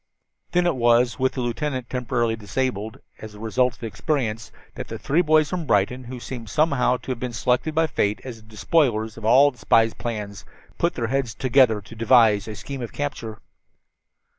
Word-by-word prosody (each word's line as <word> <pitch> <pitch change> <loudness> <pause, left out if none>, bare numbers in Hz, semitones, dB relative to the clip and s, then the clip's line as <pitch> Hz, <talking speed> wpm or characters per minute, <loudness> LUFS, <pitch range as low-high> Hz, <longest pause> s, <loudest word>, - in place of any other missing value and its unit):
Then 180 0 +3
it 175 -4 +2
was, 120 +1 +3
with 130 0 +1
the 130 - -3
lieutenant 130 +1 -3
temporarily 120 -2 -1
disabled 110 0 -3 0.2
as 110 -1 -10
a - - -12
result 120 +2 0
of - - -26
his 115 - -3
experience, 115 -4 -2 0.2
that - - -7
the - - -6
three 155 +5 +1
boys 155 -2 +3
from 175 -4 -3
Brighton, 115 +4 +1
who 125 +1 -7
seemed 120 -3 -7
somehow 140 -3 +2
to 130 - -7
have 125 - -4
been 125 -1 -4
selected 125 +7 0
by 160 0 +3
Fate 105 -7 -1
as 125 -3 -7
the 110 -1 -19
despoilers 110 -2 +1
of 110 - -9
all 135 +6 +6
the 125 - -22
spy's 115 0 +3
plans, 105 -4 -5 0.4
put 170 - +1
their 120 - -2
heads 130 -3 -1
together 130 -5 +3
to 110 +3 -13
devise 115 -3 +4
a 110 - -6
scheme 135 +3 -7
of 120 - -5
capture. 115 -7 -5
120 Hz, 195 wpm, -23 LUFS, 110-135 Hz, 0.4 s, all